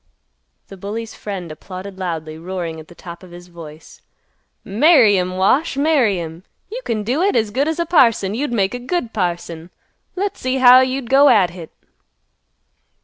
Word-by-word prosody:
The 195 - -11
bully's 215 +4 -6
friend 190 -5 -7
applauded 185 +4 -9
loudly, 160 -4 -4
roaring 170 -2 -5
at 155 - -12
the 175 - -16
top 170 -1 -10
of 185 - -14
his 175 +1 -13
voice, 160 -2 -13 0.6
"Marry 230 - +4
'em, 185 0 -3
Wash. 265 - +1
Marry 275 - +2
'em. 165 +1 -8 0.3
You - - -5
can 215 -2 -2
do 255 +9 -1
hit 400 +2 +1
as 220 -3 +1
good 275 +7 0
as 320 - -2
a 340 - -1
parson! 230 - +3
You'd 270 +4 -2
make 200 -3 0
a 245 - -4
good 250 -2 -3
parson. 175 -3 -3 0.5
Let's 395 +2 -3
see 255 +1 -1
how'd 255 0 +7
you 265 +1 -3
go 275 +4 +5
at 185 -4 +4
hit." 175 -3 -10
205 Hz, 175 wpm, -19 LUFS, 175-260 Hz, 0.6 s, how'd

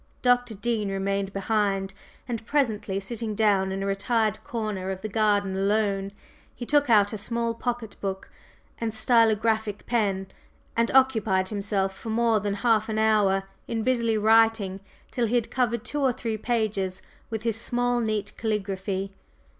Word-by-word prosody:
Dr. 245 -2 +3
Dean 215 -1 -1
remained 195 0 -1
behind, 195 -1 0 0.3
and 235 -3 -4
presently 215 -9 0
sitting 215 +1 -4
down 200 -3 +2
in 195 0 -3
a - - -2
retired 215 +2 0
corner 215 -5 -3
of 190 0 -4
the 215 - -3
garden 205 -2 +1
alone, 195 0 +1 0.5
he 240 - -6
took 290 0 +2
out 205 -2 +5
a 215 - -3
small 230 +2 -1
pocket 235 -2 -4
book 190 -1 -4 0.5
and 230 -1 -1
stylographic 220 -2 +2
pen 200 -5 0 0.5
and 230 0 +2
occupied 220 -8 +3
himself 200 -2 -1
for 225 - -8
more 225 0 +2
than 200 0 -2
half 225 -2 +3
an 215 - -2
hour 210 -3 +3 0.2
in 225 -1 -2
busily 235 -3 +1
writing 220 -3 +3 0.3
till 240 -3 0
he 235 - 0
had 235 -2 0
covered 235 -3 0
two 295 - -2
or 265 -2 +3
three 230 -2 -3
pages 215 -5 -1 0.3
with 220 -1 -4
his 225 -1 0
small, 245 0 0
neat 215 -3 -2
caligraphy. 195 -3 -2
215 Hz, 155 wpm, -26 LUFS, 195-230 Hz, 0.5 s, out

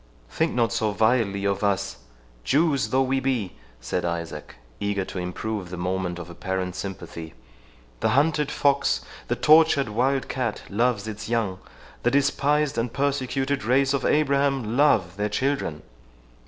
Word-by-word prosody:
"Think 160 0 0
not 115 -1 +2
so 110 -2 0
vilely 110 -2 +1
of 100 0 0
us, 100 -9 0 0.5
Jews 145 - +2
though 130 +1 +3
we 135 +1 +1
be," 125 -9 -1 0.3
said 90 +8 -2
Isaac, 85 -3 -4 0.2
eager 100 -2 -1
to 95 - -6
improve 90 +2 -4
the 90 - -6
moment 90 0 -2
of 85 - -7
apparent 90 +1 -3
sympathy; 85 -4 -7 0.6
"the - - +1
hunted 150 0 +2
fox, 140 -1 +2 0.3
the - - 0
tortured 155 -5 +5
wildcat 130 0 -1
loves 110 0 +1
its 110 0 -6
young—the 115 +1 -3
despised 140 +1 +2
and 115 0 -1
persecuted 135 -1 -1
race 135 +4 +3
of 135 -2 0
Abraham 140 -5 +1
love 105 - +3
their 105 +1 0
children!" 130 - -1
115 Hz, 140 wpm, -25 LUFS, 95-140 Hz, 0.6 s, tortured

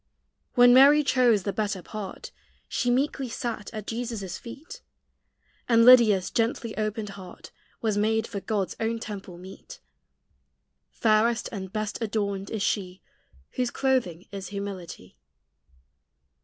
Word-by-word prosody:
When 245 -1 +7
Mary 285 +3 +7
chose 245 -7 +3
"the 200 - -2
better 205 -2 -2
part," 205 0 -7 0.4
She 245 - -1
meekly 265 +1 0
sat 230 -2 -5
at 215 -3 -7
Jesus' 225 -5 -4
feet; 320 - -10 0.9
And 230 -1 +5
Lydia's 225 -7 +6
gently 230 -1 -1
opened 215 0 -3
heart 190 -2 -11 0.3
Was 215 -2 +1
made 220 +1 +1
for 205 - -5
God's 200 -2 -2
own 225 +1 -1
temple 200 -5 -8
meet: 185 +2 -12 1.1
Fairest 225 +1 +1
and 190 -3 -6
best 215 0 -4
adorned 200 -3 -2
is 215 -3 -3
she 185 -2 -2 0.5
Whose 250 -1 -1
clothing 245 -12 -1
is 195 -2 -6
humility. 190 - -7
215 Hz, 125 wpm, -26 LUFS, 195-235 Hz, 1.1 s, When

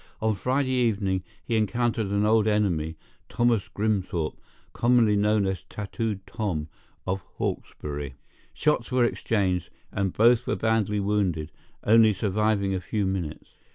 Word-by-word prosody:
On 110 0 +1
Friday 130 +6 0
evening 105 -7 +1 0.2
he 115 - -1
encountered 110 +1 +1
an 100 +1 +1
old 110 0 +4
enemy, 85 -7 +1 0.3
Thomas 120 -4 +1
Grimthorpe, 95 -7 -1 0.4
commonly 120 -3 +4
known 105 0 +2
as 95 -3 -2
Tattooed 105 0 -4
Tom, 80 -8 -3 0.4
of 95 +1 -1 0.2
Hawkesbury. 75 -2 -4 0.4
"Shots 145 -5 0
were 125 -1 +4
exchanged, 95 -7 0 0.2
and 100 -2 -1
both 120 +4 +4
were - - +1
badly 110 -2 +1
wounded, 95 -6 0 0.3
only 110 0 +6
surviving 100 0 +1
a 95 - -2
few 105 +2 -1
minutes. 95 -5 -4
105 Hz, 130 wpm, -26 LUFS, 95-115 Hz, 0.4 s, only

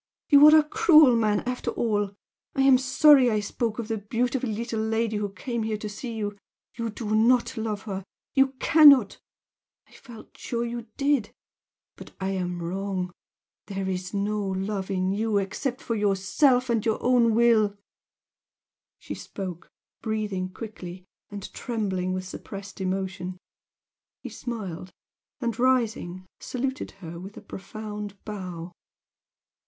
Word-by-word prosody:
You 285 -1 +8
are 310 - +8
a - - +3
cruel 310 - +6
man 215 -3 +2
after 250 0 -3
all! 205 -3 -1 0.4
I 270 - +3
am 265 -2 +6
sorry 265 0 +6
I 215 -2 +1
spoke 220 +2 -2
of 230 -3 -4
the 225 -1 -2
beautiful 245 +4 -1
little 225 +1 -3
lady 220 0 0
who 205 -1 -2
came 235 +5 -4
here 220 -1 -1
to 215 - -6
see 225 +3 -6
you 205 -2 -4 0.3
you 230 -1 -3
do 215 0 -3
not 235 +3 +3
love 215 -2 -3
her 195 -3 -5 0.3
you 270 -1 +3
cannot! 280 -5 +6 0.7
I - - -26
felt 235 -5 -14
sure 235 -1 -3
you 235 -1 -5
did 280 -6 +1 0.7
but - - -12
I 190 0 -2
am 180 -2 -3
wrong! 185 +1 -3 0.6
there 195 -1 -3
is 185 -1 -3
no 205 +1 -1
love 195 0 -3
in 185 -1 0
you 215 +1 0
except 245 +7 -2
for 230 - -3
yourself 210 +6 +2
and 225 -3 +1
your 220 -1 +1
own 240 -3 +4
will!" 220 -3 +4 1.2
She - - -7
spoke, 185 -3 -7 0.3
breathing 210 -4 -2
quickly, 185 -4 -8 0.2
and 205 -1 -8
trembling 195 -6 -2
with 185 0 -3
suppressed 195 +2 -8
emotion. 185 -1 -3 0.9
He - - -5
smiled, 190 -7 -6 0.5
and, 235 -2 -2
rising, 225 -8 +1
saluted 265 +2 -3 0.2
her 170 +1 -7
with 195 +3 -10
a - - -8
profound 210 0 -7
bow. 180 -5 -6
215 Hz, 145 wpm, -26 LUFS, 195-240 Hz, 1.2 s, You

